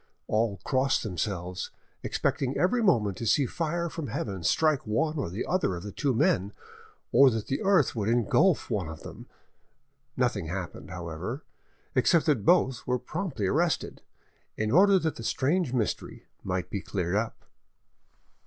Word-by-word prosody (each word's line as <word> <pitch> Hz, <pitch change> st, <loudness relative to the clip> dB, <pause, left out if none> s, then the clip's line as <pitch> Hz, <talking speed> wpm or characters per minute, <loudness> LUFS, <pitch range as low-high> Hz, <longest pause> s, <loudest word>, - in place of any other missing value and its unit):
All 110 Hz, -3 st, 0 dB
crossed 130 Hz, +1 st, +1 dB
themselves, 90 Hz, -2 st, -3 dB, 0.3 s
expecting 135 Hz, 0 st, -1 dB
every 210 Hz, +7 st, +2 dB
moment 110 Hz, -, +2 dB
to 115 Hz, -, -3 dB
see 140 Hz, +6 st, +4 dB
fire 170 Hz, +4 st, -2 dB
from 160 Hz, -3 st, -5 dB
heaven 100 Hz, -4 st, -4 dB
strike 155 Hz, -, +2 dB
one 150 Hz, +9 st, 0 dB
or 110 Hz, -, -3 dB, 0.2 s
other 180 Hz, -, +1 dB
of 85 Hz, -, -7 dB
the 105 Hz, -, -6 dB
two 135 Hz, +4 st, 0 dB
men, 120 Hz, -, +2 dB, 0.6 s
or 140 Hz, -1 st, +7 dB
that 110 Hz, -3 st, -2 dB
the 135 Hz, -, -2 dB
earth 190 Hz, -10 st, +3 dB
would 105 Hz, -1 st, -1 dB
engulf 120 Hz, -, +2 dB
one 95 Hz, -7 st, -1 dB
of 80 Hz, 0 st, -8 dB
them. -, -, -10 dB, 0.9 s
Nothing 120 Hz, -9 st, 0 dB
happened, 90 Hz, +1 st, -6 dB
however, 90 Hz, -, -5 dB, 0.5 s
except 155 Hz, +5 st, +3 dB
that 140 Hz, -10 st, +2 dB
both 135 Hz, -7 st, +3 dB
were 125 Hz, 0 st, +2 dB
promptly 140 Hz, -, -4 dB
arrested, 160 Hz, -, 0 dB, 0.6 s
in 110 Hz, 0 st, -1 dB
order 195 Hz, +5 st, +6 dB
that 160 Hz, -4 st, -1 dB
the 115 Hz, -, -7 dB
strange 145 Hz, +6 st, +1 dB
mystery 120 Hz, -5 st, -2 dB, 0.2 s
might 90 Hz, -1 st, -3 dB
be 100 Hz, -, -2 dB
cleared 90 Hz, -3 st, -3 dB
up. 110 Hz, +2 st, -2 dB
120 Hz, 155 wpm, -28 LUFS, 100-155 Hz, 0.9 s, or